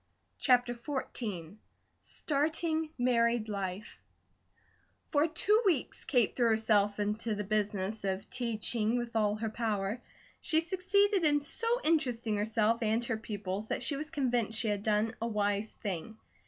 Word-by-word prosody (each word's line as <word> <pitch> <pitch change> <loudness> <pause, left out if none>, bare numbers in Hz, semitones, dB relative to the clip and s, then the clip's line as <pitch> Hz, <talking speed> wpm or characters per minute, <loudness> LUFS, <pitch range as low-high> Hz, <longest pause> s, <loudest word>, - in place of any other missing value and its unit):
CHAPTER 245 -2 +3
XIV 230 - -4 0.4
STARTING 315 +2 0
MARRIED 235 -2 +2
LIFE 195 -1 -5 1.1
FOR 295 +2 +2
two 415 +7 +3
weeks 345 - 0
Kate 245 -6 +2
threw 240 -2 +3
herself 210 -2 +2
into 210 +2 -1
the 210 - -3
business 205 0 -1
of 195 +2 -2
teaching 230 -2 0
with 240 -1 -4
all 210 -2 +2
her 220 +1 -3
power. 215 0 -2 0.4
She 315 - +3
succeeded 380 +3 +2
in 295 -2 +4
so 290 +10 -1 0.2
interesting 245 -9 +1
herself 220 +2 +1
and 225 +1 +1
her 235 -2 -1
pupils 210 -2 -4
that - - -2
she 290 - 0
was 305 +2 -5
convinced 245 -7 0
she 225 - 0
had 205 -1 -1
done 215 +2 +1
a 230 - 0
wise 205 -1 0
thing. 200 +3 -5
230 Hz, 140 wpm, -31 LUFS, 210-265 Hz, 1.1 s, in